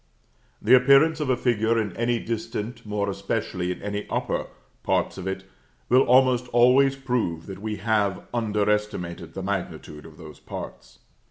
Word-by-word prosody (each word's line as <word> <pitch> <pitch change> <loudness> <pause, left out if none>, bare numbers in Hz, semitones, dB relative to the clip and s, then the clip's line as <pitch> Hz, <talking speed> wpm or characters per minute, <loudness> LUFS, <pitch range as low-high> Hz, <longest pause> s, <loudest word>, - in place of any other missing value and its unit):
The 130 - +6
appearance 140 +5 +5
of 150 -3 -2
a 130 - +2
figure 115 -2 +1
in 105 -4 -3
any 120 +1 0
distant, 115 0 -5
more 105 -1 -1
especially 100 -2 -2
in 90 - -7
any 105 0 -4
upper, - - -2 0.3
parts - - 0
of 95 - -5
it 95 0 -3 0.5
will 130 +2 +6
almost 125 -1 +4
always 125 +3 +4
prove 125 -12 -2
that 95 -1 -9
we 110 0 -3
have 105 -3 0
under 105 -3 0
estimated 90 -6 -2
the 95 - -5
magnitude 90 -6 -5
of 80 -1 -16
those 80 -3 -12
parts. - - -9
105 Hz, 160 wpm, -25 LUFS, 95-125 Hz, 0.5 s, The